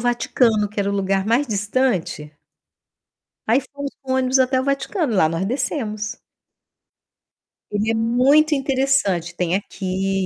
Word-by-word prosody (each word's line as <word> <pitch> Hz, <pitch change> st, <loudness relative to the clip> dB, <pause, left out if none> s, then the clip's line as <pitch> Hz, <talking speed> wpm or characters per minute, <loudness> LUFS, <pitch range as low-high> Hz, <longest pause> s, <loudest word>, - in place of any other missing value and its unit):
Vaticano, 235 Hz, -2 st, +1 dB
que 205 Hz, 0 st, -4 dB
era 200 Hz, -, 0 dB
o -, -, -2 dB
lugar 195 Hz, 0 st, 0 dB
mais 240 Hz, +6 st, +2 dB
distante 205 Hz, -, -1 dB, 1.2 s
aí 235 Hz, +5 st, +3 dB
fomos 280 Hz, 0 st, -5 dB
com 260 Hz, -1 st, -3 dB
ônibus 260 Hz, 0 st, +2 dB
até 260 Hz, 0 st, +2 dB
o -, -, -1 dB
Vaticano, 275 Hz, -, -1 dB
lá 170 Hz, -5 st, +4 dB
nós 165 Hz, +3 st, -2 dB
descemos. 230 Hz, -3 st, -3 dB, 1.5 s
Ele 210 Hz, +2 st, 0 dB
é -, -, 0 dB
muito 260 Hz, +7 st, +3 dB
interessante, 265 Hz, -, 0 dB
tem 175 Hz, 0 st, 0 dB
aqui 195 Hz, 0 st, -2 dB
225 Hz, 135 wpm, -21 LUFS, 195-265 Hz, 1.5 s, lá